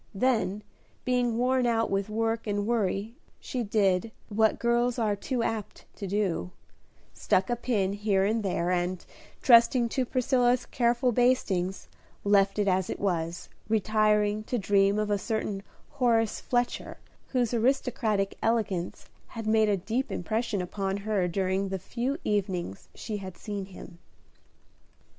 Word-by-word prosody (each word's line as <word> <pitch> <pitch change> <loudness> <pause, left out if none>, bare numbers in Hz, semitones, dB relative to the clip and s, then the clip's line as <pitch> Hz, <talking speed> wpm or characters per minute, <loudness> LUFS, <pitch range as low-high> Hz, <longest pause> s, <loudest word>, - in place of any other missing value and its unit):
Then, 215 -3 +1 0.4
being 245 -2 +1
worn 250 0 +2
out 225 -1 +1
with 195 +1 0
work 225 +1 -1
and 205 -1 -1
worry, 215 -1 -1 0.3
she 255 - -4
did, 205 -1 +1 0.2
what 220 +1 +2
girls 240 +1 +1
are 215 -3 +1
too 240 +4 -2
apt 220 -3 -4
to 200 - -5
do, 190 - -1 0.6
stuck 190 +5 +1
a - - +2
pin 215 -5 0
here 200 -2 +1
and 220 +2 +1
there, 180 -3 -1
and, 180 0 -1 0.4
trusting 235 0 +6
to 260 +2 0
Priscilla's 250 -1 +2
careful 240 +1 +1
bastings, 210 -7 +1 0.4
left 200 -1 +3
it 205 -1 +1
as 185 -1 +1
it - - -4
was, 170 -3 -2 0.2
retiring 215 0 +2
to 245 - -1
dream 200 0 +3
of 210 -1 0
a 205 - +1
certain 210 -1 -2 0.3
Horace 235 -5 +1
Fletcher, 245 -1 -1 0.3
whose 245 -3 0
aristocratic 225 -4 0
elegance 210 -6 -1 0.2
had 225 -1 -7
made 220 0 +3
a 200 - +2
deep 225 +8 -2
impression 215 0 -1
upon 195 +1 -2
her 200 -3 0
during 190 +2 -1
the 190 - -2
few 240 - -3
evenings 185 - -2
she 215 - -5
had 190 -3 -8
seen 205 -2 -5
him. 180 -2 -12
215 Hz, 145 wpm, -28 LUFS, 195-235 Hz, 0.6 s, trusting